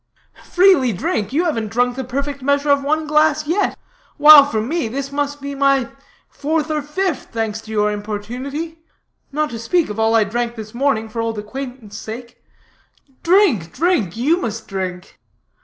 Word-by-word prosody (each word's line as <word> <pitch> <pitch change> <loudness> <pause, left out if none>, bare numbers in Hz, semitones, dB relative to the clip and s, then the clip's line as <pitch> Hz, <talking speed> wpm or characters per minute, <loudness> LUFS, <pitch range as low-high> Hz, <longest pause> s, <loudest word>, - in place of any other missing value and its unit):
"Freely 360 -9 +4
drink? 200 +3 -2
you 325 +6 +1
haven't 225 -10 -1
drunk 245 +3 0
the 265 - -4
perfect 280 +2 -4
measure 285 +2 +1
of 280 0 +3
one 310 +2 0
glass, 305 0 +2
yet. 345 +7 0 0.4
While 295 -1 +9
for 225 -6 -1
me, 285 +5 -1
this 275 +4 -4
must 285 0 -2
be 280 0 -6
my 275 -2 +2 0.4
fourth 310 +1 -2
or 305 -1 0
fifth, 325 +2 -2
thanks 220 -1 -3
to 220 - -12
your 210 -1 +1
importunity; 245 +10 -5 0.5
not 300 +1 -1
to 230 - -6
speak 315 +8 +1
of 210 - -6
all 225 +1 +3
I 225 - +5
drank 235 +3 -3
this 215 -1 -9
morning, 240 -3 0
for 230 +1 -4
old 225 -1 -3
acquaintance' 225 -1 -7
sake. 235 +3 -9 0.8
Drink, 335 - +3
drink; 275 - 0
you 295 +9 +2
must 225 - -5
drink." 185 -2 -6
265 Hz, 170 wpm, -19 LUFS, 220-300 Hz, 0.8 s, While